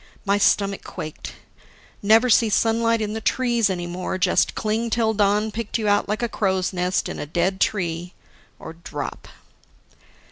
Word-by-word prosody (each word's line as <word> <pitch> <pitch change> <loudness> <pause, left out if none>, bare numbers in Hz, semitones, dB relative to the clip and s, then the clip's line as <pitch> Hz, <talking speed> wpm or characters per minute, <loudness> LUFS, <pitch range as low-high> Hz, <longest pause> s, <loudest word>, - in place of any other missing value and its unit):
My 200 0 +2
stomach 200 -1 +2
quaked: 155 -4 -7 0.7
Never 220 +4 +5
see 230 -1 +4
sunlight 230 +2 +2
in 210 0 -3
the 220 - -4
trees 240 -3 +1
any 175 -2 -3
more, 180 +2 -4
just 185 - +2
cling 220 +2 -1
till 225 -1 +1
dawn 210 +1 +1
picked 225 0 -3
you 220 -2 -2
out 205 0 +2
like 215 +3 -1
a - - +2
crow's 190 -4 -1
nest 180 +1 0
in - - -6
a - - -5
dead 175 +5 0
tree; 175 -3 -1 0.4
or 160 - -9
drop 160 -3 -7
205 Hz, 165 wpm, -23 LUFS, 180-220 Hz, 0.7 s, Never